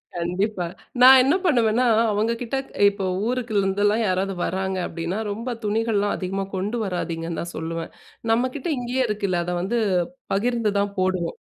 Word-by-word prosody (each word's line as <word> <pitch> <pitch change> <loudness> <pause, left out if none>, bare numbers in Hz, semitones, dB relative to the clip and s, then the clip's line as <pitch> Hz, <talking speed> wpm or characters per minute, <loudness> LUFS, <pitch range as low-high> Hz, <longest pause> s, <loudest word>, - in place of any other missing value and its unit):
கண்டிப்பா. 180 +3 -1 0.4
நான் 260 +1 +10
என்ன 285 +7 +3
பண்ணுவேன்னா, 245 -5 +3 0.3
அவங்ககிட்ட 230 +4 -1 0.3
இப்போ 200 -1 -4 0.2
ஊருக்குலிருந்துலாம் 210 -3 +1
யாராவது 190 +1 0
வராங்க 190 +1 -2
அப்பிடின்னா, 170 +4 -3
ரொம்ப 230 +4 -4
துணிகள்லாம் 210 -1 +1
அதிகமா 195 +1 -3
கொண்டு 200 +5 -2
வராதீங்கன்னு 170 -3 -3
தான் 170 0 -6
சொல்லுவேன். 165 0 -4 0.4
நம்மக்கிட்ட 255 +6 0
இங்கேயே 245 +2 0
இருக்குல்ல. 200 -4 -1
அத 180 - -2
வந்து 235 +6 0 0.5
பகிர்ந்து 230 +1 +1
தான் 200 0 -1
போடுவோம். 185 -2 0
205 Hz, 130 wpm, -23 LUFS, 185-235 Hz, 0.5 s, நான்